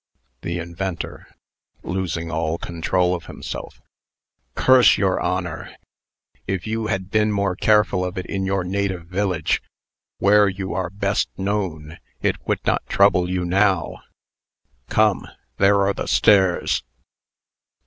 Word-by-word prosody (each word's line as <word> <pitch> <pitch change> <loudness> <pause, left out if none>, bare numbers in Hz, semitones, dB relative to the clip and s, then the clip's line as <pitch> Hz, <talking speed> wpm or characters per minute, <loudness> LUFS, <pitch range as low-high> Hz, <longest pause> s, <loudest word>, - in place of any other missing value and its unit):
THE 85 0 -3
INVENTOR 85 +1 -5 0.6
(losing 85 -3 -3
all 80 0 -1
control 90 +2 0
of 85 - -5
himself). - - -7 0.8
"Curse 130 -1 +6
your 95 -2 +1
honor. 90 -2 -3 0.7
If 95 -3 -2
you 110 0 -2
had 95 -1 -3
been 105 0 +2
more 100 -2 0
careful 105 -3 +2
of 90 +2 -4
it 95 - -3
in 95 -1 -3
your 95 -1 0
native 95 -2 -2
village 90 -2 -1 0.6
where 105 +1 +5
you 95 -1 -5
are 90 0 -2
best 100 +1 -1
known 90 -6 -3 0.2
it - - 0
would - - -1
not - - +1
trouble 95 -3 +3
you 90 -1 -1
now. 95 -2 +1 0.9
Come, 110 -2 +2 0.3
there 100 0 +4
are 100 0 +2
the - - -5
stairs." 95 -4 +3
95 Hz, 130 wpm, -22 LUFS, 90-100 Hz, 0.9 s, Curse